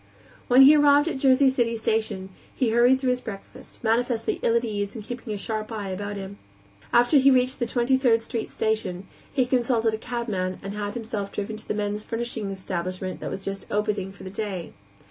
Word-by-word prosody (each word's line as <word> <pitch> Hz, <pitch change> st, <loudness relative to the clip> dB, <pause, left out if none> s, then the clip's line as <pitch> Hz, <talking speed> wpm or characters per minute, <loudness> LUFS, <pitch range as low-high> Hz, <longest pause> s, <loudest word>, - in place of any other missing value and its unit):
When 255 Hz, +2 st, +7 dB
he 290 Hz, +3 st, +9 dB
arrived 290 Hz, +1 st, +5 dB
at -, -, 0 dB
the -, -, -8 dB
Jersey 265 Hz, 0 st, +5 dB
City 240 Hz, -3 st, +2 dB
station 220 Hz, -4 st, -1 dB, 0.3 s
he 245 Hz, -4 st, +1 dB
hurried 245 Hz, +3 st, +5 dB
through 260 Hz, -1 st, +1 dB
his 250 Hz, 0 st, -1 dB
breakfast, 205 Hz, +1 st, -10 dB
manifestly 230 Hz, 0 st, 0 dB
ill 230 Hz, -, +2 dB
at 235 Hz, +1 st, +2 dB
ease 205 Hz, -1 st, -3 dB
and 220 Hz, -, -6 dB
keeping 240 Hz, 0 st, -6 dB
a 210 Hz, -, -2 dB
sharp 215 Hz, +2 st, -4 dB
eye 210 Hz, -3 st, -4 dB
about 205 Hz, +2 st, -4 dB
him. 200 Hz, 0 st, -7 dB, 0.5 s
After 245 Hz, +5 st, +5 dB
he 270 Hz, +1 st, +6 dB
reached 255 Hz, 0 st, +2 dB
the 240 Hz, -, 0 dB
Twenty 250 Hz, +2 st, +2 dB
third 230 Hz, -4 st, +3 dB
Street 230 Hz, -1 st, -4 dB
station, 200 Hz, -4 st, -2 dB, 0.3 s
he 260 Hz, -3 st, +2 dB
consulted 240 Hz, -3 st, +1 dB
a 220 Hz, -, -3 dB
cabman 215 Hz, -7 st, -3 dB
and 195 Hz, +1 st, -5 dB
had 205 Hz, 0 st, -4 dB
himself 215 Hz, -4 st, -4 dB
driven 210 Hz, +1 st, -4 dB
to 215 Hz, -, -7 dB
a -, -, 0 dB
men's 210 Hz, 0 st, -2 dB
furnishings 225 Hz, -3 st, -4 dB
establishment 185 Hz, 0 st, -4 dB
that -, -, -5 dB
was 195 Hz, 0 st, -6 dB
just 195 Hz, 0 st, -5 dB
opening 205 Hz, -2 st, -1 dB
for 195 Hz, -, -13 dB
the 185 Hz, -, -7 dB
day. 200 Hz, -4 st, -5 dB
220 Hz, 205 wpm, -25 LUFS, 200-245 Hz, 0.5 s, he